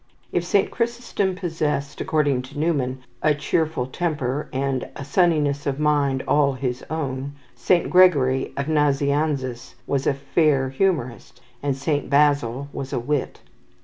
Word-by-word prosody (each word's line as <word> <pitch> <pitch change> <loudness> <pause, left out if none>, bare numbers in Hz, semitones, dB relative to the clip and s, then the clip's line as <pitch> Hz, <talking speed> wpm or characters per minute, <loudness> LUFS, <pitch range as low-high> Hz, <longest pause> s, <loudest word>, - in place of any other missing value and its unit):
If 175 - 0
Saint 195 +3 +1
Chrysostom 235 -5 -1
possessed, 155 -6 -2
according 145 -5 +1
to 135 +3 -11
Newman, 135 -5 -1 0.2
a 150 -1 +3
cheerful 155 -1 0
temper, 145 -2 -2
and 135 -1 -2
"a 140 - -7
sunniness 145 -3 +1
of 140 0 -1
mind 145 -3 +1
all 145 -2 +3
his 125 -1 -3
own," 140 -3 -3 0.2
Saint 165 +9 +2
Gregory 140 -8 +4
of 140 - -1
Nazianzus 145 -3 0
was 140 -1 -1
a 140 - +2
fair 140 -1 +1
humourist, 135 -7 -1 0.2
and 140 -2 -1
Saint 145 +1 -1
Basil 140 -3 +2
was 135 -1 -5
a 125 - 0
wit. 140 +3 -2
145 Hz, 140 wpm, -23 LUFS, 135-155 Hz, 0.2 s, Gregory